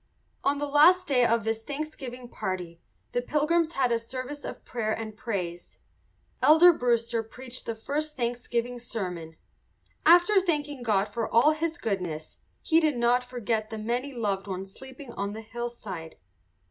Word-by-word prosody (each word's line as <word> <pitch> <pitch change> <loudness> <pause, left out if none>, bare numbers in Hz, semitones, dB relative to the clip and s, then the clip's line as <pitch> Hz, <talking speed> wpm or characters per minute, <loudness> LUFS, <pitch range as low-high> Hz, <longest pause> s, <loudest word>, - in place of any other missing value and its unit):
On 280 +1 +2
the 290 - -1
last 310 +6 +6
day 255 -3 +3
of 230 -1 +3
this 225 0 -2
Thanksgiving 275 -4 -6
party 180 -6 -5 0.3
the 245 - 0
Pilgrims 315 +5 +1
had 255 -3 +1
a 230 - +2
service 255 +5 -6
of - - -7
prayer 220 -3 -2
and 220 -1 -4
praise. 185 -7 -4 0.6
Elder 340 +3 +8
Brewster 235 -4 +1
preached 250 +3 -8
the 230 - -2
first 300 +7 -3
Thanksgiving 240 0 -2
sermon. 180 -9 -5 0.7
After 355 +4 +6
thanking 295 -6 -1
God 210 -3 +1
for 230 -2 -2
all 240 +7 +5
his 320 +1 -2
goodness, 180 - -3 0.3
he 325 -1 +4
did 305 -5 +1
not 240 +1 +3
forget 235 -3 -2
the 220 - -5
many 240 +6 -2
loved 205 -6 -2
ones 190 0 -5
sleeping 265 -1 -11
on 200 +1 -3
the 220 - -6
hillside. 220 -8 -6
240 Hz, 155 wpm, -28 LUFS, 215-285 Hz, 0.7 s, Elder